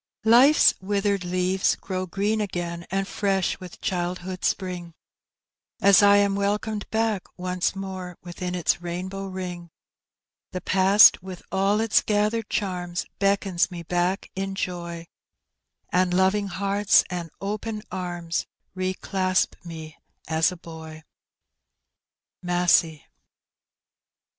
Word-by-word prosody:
Life's 250 +7 +6
withered 200 0 0
leaves 185 +1 +1
grow 185 -1 -4
green 205 +4 0
again 175 -3 -4
and 195 0 -1
fresh 195 -3 0
with 180 -2 -11
childhood's 180 0 -1
spriDg, 180 -3 -7 0.9
As 200 0 +6
I 205 0 +6
am 200 -1 +3
welcomed 205 +1 -2
back 220 -3 -1
once 180 0 -1
mofe 190 -2 -6
within 180 +1 -5
its 175 0 0
rainbow 185 +3 -5
ring; 180 -2 -6 0.8
The 185 - -4
pasty 195 +2 +6
with 185 -1 -9
all 195 +2 +2
its 225 -1 +3
gathered 210 +1 0
charms, 180 -4 -2
beckons 195 -2 +1
me 175 -2 -7
back 175 +3 -1
in 195 0 -4
joy, 170 -2 -4 0.9
And 180 0 +2
loving 190 +2 +2
hearts 200 +2 +3
and 175 -2 -4
open 210 +2 -4
arms 175 -2 -3 0.3
re 185 0 -2
clasp 185 -1 0
me 160 -2 -9 0.3
as 160 +1 +2
a 180 - -8
boy. 160 -1 -10 1.4
Masset. 175 -3 +2
185 Hz, 115 wpm, -25 LUFS, 175-200 Hz, 1.4 s, Life's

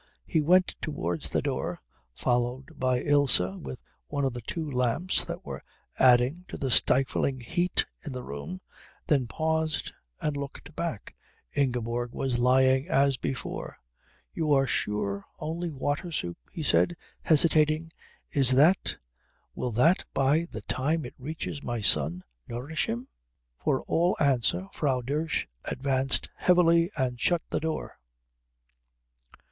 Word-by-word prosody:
He 160 - +1
went 180 +4 +4
towards 85 - -3
the - - 0
door, - - -2 0.4
followed 125 +2 -1
by 130 -1 +1
Ilse 145 -2 +5 0.2
with 65 -2 -8 0.2
one 145 -1 -1
of 135 - 0
the 120 - -6
two 160 +8 -4
lamps 125 +6 +1
that - - -6
were - - -6 0.4
adding 130 +6 +5
to - - -7
the 135 -2 -2
stifling 130 +1 +3
heat 175 +8 +1 0.2
in 150 - -5
the 125 -1 -5
room, 70 +4 -6 0.4
then 135 -5 +2
paused 160 +4 -1 0.3
and 150 -1 -1
looked 140 +2 -7
back. 165 -11 -4 0.4
Ingeborg 120 -3 -1
was 130 -3 -1
lying 130 +2 +4
as 140 0 +3
before. 130 +1 -4 0.6
"You 155 -2 -1
are 135 -1 +4
sure 100 -4 -1
only 165 +3 -3
water 145 +4 -2
soup?" 85 - -3
he 160 - -5
said, 175 +3 +3 0.2
hesitating. 155 0 +3 0.4
"Is 135 -3 +4
that 155 +8 +4 0.6
will 125 - -2
that 155 +11 +4
by 145 +5 +3
the - - -6
time 155 +4 -1
it - - -8
reaches 150 +1 -5
my 120 -3 -3
son 85 -3 +2 0.2
nourish 130 +7 -2
him?" 120 +3 -3 0.6
For - - +1
all 175 +3 +1
answer 120 - +2
Frau 135 -4 0
Dosch 150 +6 -1 0.2
advanced 135 0 0
heavily 170 -1 +4
and 125 -3 -1
shut 175 -2 +2
the - - +1
door. 160 0 -4
135 Hz, 135 wpm, -28 LUFS, 125-160 Hz, 0.6 s, Ilse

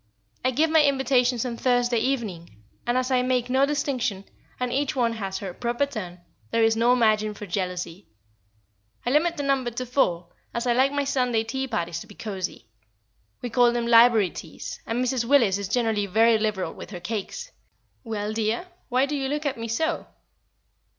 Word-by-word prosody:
I 255 - +3
give 305 +5 +2
my 320 -1 +6
invitations 260 -3 +2
on 235 -2 -4
Thursday 245 -1 +2
evening; 190 - -3 0.2
and 240 +1 +2
as 255 +1 0
I 255 -1 +4
make 250 -1 0
no 270 +2 +4
distinction, 260 -9 -1 0.3
and 250 -1 -1
each 285 +1 0
one 235 -3 +1
has 195 -4 -4
her 190 -2 -6
proper 240 +6 0
turn, 185 -10 -7 0.3
there 230 0 +2
is 225 0 +4
no 235 +2 +4
margin 215 -3 +2
for 210 - -7
jealousy. 180 -1 -4 1.0
I 245 - +1
limit 335 +4 +2
the 290 - -2
number 270 -3 +1
to 240 +2 -4
four, 180 -9 0 0.3
as 235 +1 -1
I 240 - +3
like 260 +3 +3
my 285 0 0
Sunday 250 -5 +1
tea 265 +4 -3
parties 170 -7 -2
to - - -10
be 205 - -14
cosy. 195 -4 -5 0.8
We 245 - -3
call 245 0 +5
them 240 -1 -1
library 230 -4 +6
teas, 160 - -8
and 245 +3 0
Mrs. 255 -1 0
Willis 230 -7 +4
is 200 - -3
generally 220 -3 +1
very 225 +3 +4
liberal 215 -4 -1
with - - -10
her 185 -3 -7
cakes. 220 - -5 0.5
Well, 215 -2 -3
dear, 225 +10 -1 0.2
why 255 +1 +3
do 295 +1 -3
you 270 -1 -1
look 295 +2 -2
at 275 -4 -1
me 230 - -4
so?" 320 +9 -1
235 Hz, 190 wpm, -25 LUFS, 210-260 Hz, 1.0 s, my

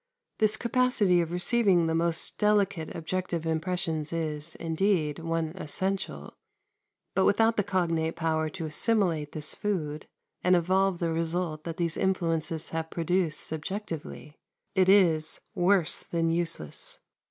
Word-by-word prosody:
This 215 0 +3
capacity 235 -7 +3
of 165 -1 -3
receiving 180 -1 +2
the 160 - 0
most 165 0 0
delicate 200 -6 +1
objective 170 0 -3
impressions 160 -1 -1
is, 155 -1 -2
indeed, 165 -2 0
one 165 -1 -1
essential; 190 +3 -3 0.8
but 190 - +2
without 225 +2 +3
the 210 - +2
cognate 170 -4 0
power 160 -1 0
to 165 +1 -6
assimilate 165 -2 0
this 155 -1 -1
food, 155 -7 -3 0.4
and 180 0 +5
evolve 185 +2 +2
the 170 -1 -1
result 165 -1 -2
that 165 -1 -5
these 170 -2 0
influences 165 -4 0
have 160 0 -3
produced 170 -1 0
subjectively, 160 -2 -6 0.3
it 190 -1 +3
is, 165 -6 +4
worse 180 -2 +3
than 165 -1 -1
useless. 165 - -2
170 Hz, 130 wpm, -28 LUFS, 160-190 Hz, 0.8 s, and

